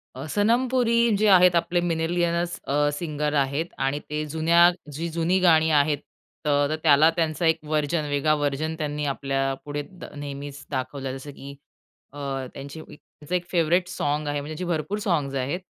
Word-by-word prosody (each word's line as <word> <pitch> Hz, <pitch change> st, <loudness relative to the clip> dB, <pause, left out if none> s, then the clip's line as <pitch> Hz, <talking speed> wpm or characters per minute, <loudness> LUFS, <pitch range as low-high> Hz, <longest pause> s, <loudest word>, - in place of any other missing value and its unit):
अ, 130 Hz, +3 st, -6 dB
'सनम 225 Hz, -, +2 dB
पुरी' 235 Hz, -3 st, +3 dB
जे 215 Hz, +1 st, +2 dB
आहेत 180 Hz, -3 st, +6 dB
आपले 170 Hz, +1 st, +1 dB
मिनीलियनस 170 Hz, +1 st, 0 dB
अ, 145 Hz, +1 st, +2 dB
सिंगर 150 Hz, -1 st, -2 dB
आहेत 140 Hz, +5 st, -2 dB, 0.2 s
आणि 140 Hz, +2 st, 0 dB
ते 150 Hz, 0 st, -2 dB
जुन्या 170 Hz, +2 st, +5 dB, 0.2 s
जी 160 Hz, +4 st, -4 dB
जुनी 170 Hz, +3 st, +1 dB
गाणी 160 Hz, -3 st, +4 dB
आहेत. 145 Hz, -1 st, +3 dB, 0.5 s
तर 145 Hz, +1 st, +2 dB
त्याला 155 Hz, 0 st, +6 dB
त्यांचा 160 Hz, 0 st, 0 dB
एक 160 Hz, 0 st, +4 dB
व्हर्जन, 150 Hz, +1 st, 0 dB
वेगळा 145 Hz, +2 st, +2 dB
व्हर्जन 145 Hz, +2 st, -1 dB
त्यांनी 150 Hz, -1 st, -3 dB
आपल्यापुढे 135 Hz, +1 st, -2 dB, 0.3 s
नेहमीच 145 Hz, 0 st, -7 dB
दाखवलं. 135 Hz, 0 st, -3 dB
जसं 145 Hz, +2 st, -9 dB
की 140 Hz, 0 st, -10 dB, 0.6 s
अ, -, -, -11 dB, 0.4 s
त्यांची 140 Hz, +3 st, -8 dB
त्यांचं 150 Hz, +2 st, -8 dB
एक 180 Hz, -, -1 dB
फेवरेट 175 Hz, +1 st, +2 dB
साँग 150 Hz, -3 st, -2 dB
आहे, 145 Hz, 0 st, -1 dB
म्हणजे 155 Hz, +2 st, -7 dB
त्यांचे 180 Hz, -, -4 dB
भरपूर 165 Hz, +6 st, -2 dB
साँग्स 150 Hz, -9 st, -1 dB
आहेत. 135 Hz, +7 st, -1 dB
155 Hz, 160 wpm, -25 LUFS, 145-170 Hz, 0.6 s, आहेत